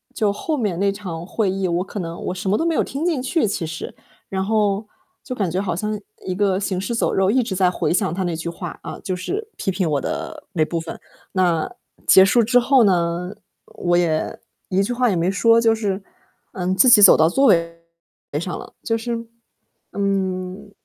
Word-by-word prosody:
就 210 -4 +1
后 305 +9 -2
面 200 -7 -1
那 200 0 +2
场 180 -5 -6
会 200 -2 0
议 190 -1 -1
我 175 +1 0
可 200 +1 -7
能 170 -1 -6
我 - - -1
什 185 +1 -3
么 205 - +3
都 330 - -1
没 335 - +1
有 - - +3
听 280 +5 -3
进 320 -7 0
去， 260 +1 +1
其 195 -4 -2
实， 160 +1 -6 0.4
然 190 0 -2
后 210 -1 +1 0.4
就 255 - -5
感 195 -6 -1
觉 185 - 0
好 180 -4 -2
像 210 +3 -3 0.3
一 185 - -2
个 195 -1 +1
行 190 -2 -2
尸 235 +4 -3
走 - - 0
肉， 190 0 +2
一 255 0 +3
直 205 -4 -4
在 185 -1 +3
回 175 - -1
想 190 -2 +1
他 190 +1 -2
那 175 -2 -2
句 165 +1 -4
话， 170 0 -7
啊， - - -7
就 185 - -3
是 400 - -4
批 - - -2
评 180 -2 -1
我 145 -2 0
的 - - -5
那 155 -3 +2
部 165 +1 -3
分， 165 0 -7 0.3
那 175 -4 +1 0.4
结 190 - +8
束 235 +4 +4
之 245 +3 +4
后 260 0 +4
呢， 180 -2 +1 0.3
我 175 0 -1
也 160 -3 0 0.3
一 190 +1 +2
句 245 +5 -2
话 245 -1 +2
也 185 - 0
没 170 +2 +1
说， 230 +3 +4
就 225 -1 +4
是， 200 -3 -2 0.5
嗯， 185 0 -1
自 195 +7 +6
己 225 -4 +8
走 200 - +10
到 160 +1 +4
座 270 +9 +2
位 170 -2 +2 0.6
上 175 +2 -4
了。 - - -11
就 225 - 0
是 230 0 -4 0.7
嗯， 195 0 -2
195 Hz, 235 characters per minute, -21 LUFS, 175-220 Hz, 0.7 s, 走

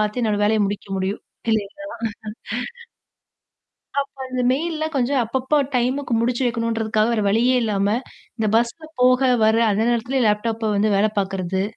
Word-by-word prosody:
பார்த்து 210 +3 0
என்னோட 215 -2 +1
வேலைய 215 +1 +2
முடிக்க 205 0 -4
முடியும் 190 +2 -2 0.3
இல்லேங்களா! 220 +7 -2 2.1
அப்போ, 275 0 -3
அந்த 255 0 -3
மெயில்ல 315 +3 -1
கொஞ்சம் 260 +1 +2
அப்பப்போ 265 +5 0 0.2
டைமுக்கு 255 +2 0
முடிச்சு 245 +2 0
வைக்கணுன்றதுக்காக 225 -2 0
வேற 220 -2 +1
வழியே 235 +5 +3
இல்லாம, 200 -3 0 0.5
இந்த 220 -2 0
பஸ்ல 240 +7 0 0.2
போக, 255 +1 +5 0.2
வர 220 +1 +4
அந்த 205 +2 +1
நேரத்துலேயே 240 +3 0
லேப்டாப்வு 220 +1 0
வந்து 210 +2 +2
வேல 205 +2 +4
பார்க்கிறது, 190 -1 -1
230 Hz, 140 wpm, -22 LUFS, 210-255 Hz, 2.1 s, போக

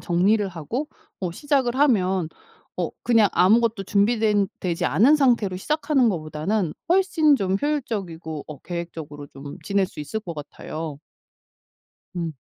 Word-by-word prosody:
정리를 200 +5 +2
하고 190 - -4 0.3
어 180 -3 -2
시작을 265 - 0
하면 190 - +2 0.5
어 - - -1
그냥 225 -4 +4
아무것도 225 +2 +3
준비된 210 0 +2
되지 175 -1 -1
않은 265 +13 +5
상태로 235 -9 +2
시작하는 295 +2 +1
거보다는 165 +1 -1 0.2
훨씬 345 -5 +4
좀 190 -4 0
효율적이고 195 - -3
어 150 -2 -9
계획적으로 165 -4 -6
좀 140 +1 -10
지낼 200 -1 +1
수 - - -16
있을 150 +9 -4
것 175 -6 -7
같아요. 155 0 -7 1.2
음. 165 -2 -3
195 Hz, 295 characters per minute, -24 LUFS, 165-240 Hz, 1.2 s, 않은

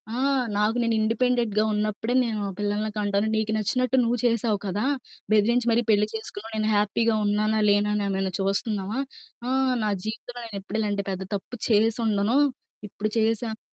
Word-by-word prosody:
ఆహ్, 270 0 +1
నాకు 210 +2 +2
నేను 230 - +1
ఇండిపెండెంట్‌గా 225 -1 +1
ఉన్నప్పుడే 215 +3 -1
నేను 220 -3 -2 0.2
పిల్లల్ని 210 +1 -1
కంటాను. 205 +1 +1
నీకు 220 0 0
నచ్చినట్టు 255 +4 +1
నువ్వు 240 +1 0
చేశావు 230 -3 +1
కదా! 205 +6 -1 0.5
బెదిరించి 235 +3 +3
మరి 235 +1 +2
పెళ్ళి 210 0 +3
చేసుకున్నావు. 220 0 -7
నేను 215 0 +1
హ్యాపీగా 215 +2 +2
ఉన్నానా, 215 +1 +1
లేనా 205 +1 +3
అని 205 -1 -1
నన్ను 190 -1 -1
చూస్తున్నావా? 200 +3 -1 0.5
ఆ! - - 0 0.3
నా 210 - +1
జీవితంలో 230 +3 -6
నేనెప్పుడు 200 0 -5
ఇలాంటి 205 -2 -1
పెద్ద 190 0 -4
తప్పు 200 +5 -6
చేసుండను. 220 +1 +2 0.5
ఇప్పుడు 215 +2 -3
చేసాను. 225 0 0
215 Hz, 150 wpm, -25 LUFS, 205-230 Hz, 0.5 s, బెదిరించి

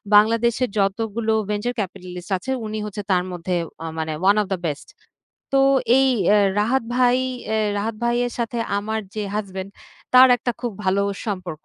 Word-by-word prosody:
বাংলাদেশে 230 +3 +4
যতগুলো 220 +3 0 0.2
venture 210 +4 -1
capitalist 180 -2 -6
আছে 185 +9 -5
উনি 215 0 -4
হচ্ছে 210 0 -5
তার 180 -1 +3
মধ্যে 180 +1 -3 0.3
আ - - -5
মানে 160 -1 -2
ওয়ান 200 +2 +5
অব 205 - -3
দা - - -1
বেস্ট। 150 -2 -5 0.7
তো - - +5 0.4
এই 270 - +4 0.2
অ্যা 210 - +6 0.2
রাহাত 245 +6 +1
ভাই 250 -1 +4 0.4
এ - - +2 0.2
রাহাত 220 +2 -2
ভাইয়ের 240 0 +1
সাথে 235 0 -2 0.2
আমার 220 +2 -2
যে 215 - -2
হাসব্যান্ড 195 -2 -4 0.4
তার 255 +1 +9
একটা 245 +1 -2
খুব 240 -2 -3
ভালো 190 +1 +2 0.2
সম্পর্ক। 185 -7 -5
210 Hz, 165 wpm, -22 LUFS, 190-235 Hz, 0.7 s, তার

